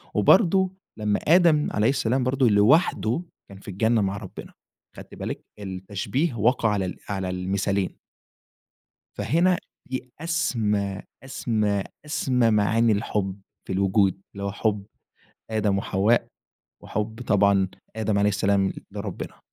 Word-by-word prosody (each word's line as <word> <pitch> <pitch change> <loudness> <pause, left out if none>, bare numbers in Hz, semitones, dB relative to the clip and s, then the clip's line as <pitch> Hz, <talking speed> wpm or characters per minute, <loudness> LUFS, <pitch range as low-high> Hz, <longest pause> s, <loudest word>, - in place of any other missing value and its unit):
وبرضو 190 - +4 0.3
لمّا 105 -1 +1
آدم 165 -2 +5
عليه 105 +2 +2
السلام 130 -1 +1
برضو 130 0 +2
لوحده 115 - +3 0.3
كان 95 0 -11
في - - -18
الجنة 110 +4 +1
مع 100 0 -1
ربنا. - - -9 0.4
خدتِ - - -11
بالك - - -5 0.2
التشبيه 100 - -2
وقع 115 +1 +2
على 95 -3 -1
على 95 -2 -2
المثالين. 95 +1 -1 1.2
فهنا 175 +3 +2 0.3
دي 130 -1 -4
أسمى، 110 - -1 0.2
أسمى، 105 -6 -1 0.2
أسمى، 125 -5 +1
معاني 110 +2 +3
الحب 100 -2 -2 0.3
في - - -4
الوجود 95 0 +2
اللي 100 0 -6
هو 100 - -2
حب 105 -1 -1 0.6
آدم 105 -3 +1
وحواء، 100 +5 +2 0.6
وحب 110 +3 -4
طبعًا 100 -2 +4 0.3
آدم 110 -2 0
عليه 105 0 +3
السلام 100 0 +1 0.2
لربنا. 100 -2 -6
105 Hz, 120 wpm, -25 LUFS, 100-125 Hz, 1.2 s, آدم